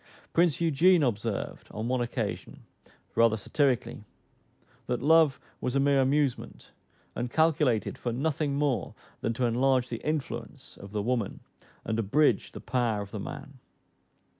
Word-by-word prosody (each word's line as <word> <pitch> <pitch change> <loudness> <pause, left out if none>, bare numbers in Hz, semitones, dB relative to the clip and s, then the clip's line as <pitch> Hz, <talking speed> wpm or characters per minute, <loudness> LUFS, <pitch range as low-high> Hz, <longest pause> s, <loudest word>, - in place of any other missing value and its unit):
Prince 170 -3 +3
Eugene 170 +1 +4
observed, 115 -4 -2
on 110 +2 -4
one 125 0 0
occasion, 120 - -4 0.5
rather 115 -1 +4
satirically, 125 +1 0 0.8
that 125 -1 -1
love 155 0 +4 0.2
was 125 - -2
a - - +3
mere 140 0 +3
amusement, 135 -1 -1 0.4
and 120 +1 -2
calculated 150 -7 +1
for 120 - -2
nothing 140 +3 -1
more 140 - -1 0.2
than 115 - -1
to 125 +2 0
enlarge 125 +1 +2
the 115 - -5
influence 135 -3 -4
of 100 0 -11
the 105 -1 -2
woman, 120 -3 -1 0.5
and 110 0 -1
abridge 135 +8 +2
the - - -7
power 115 -5 -1
of 100 - -13
the 105 - -5
man. 140 +6 -8
130 Hz, 140 wpm, -28 LUFS, 115-145 Hz, 0.8 s, Eugene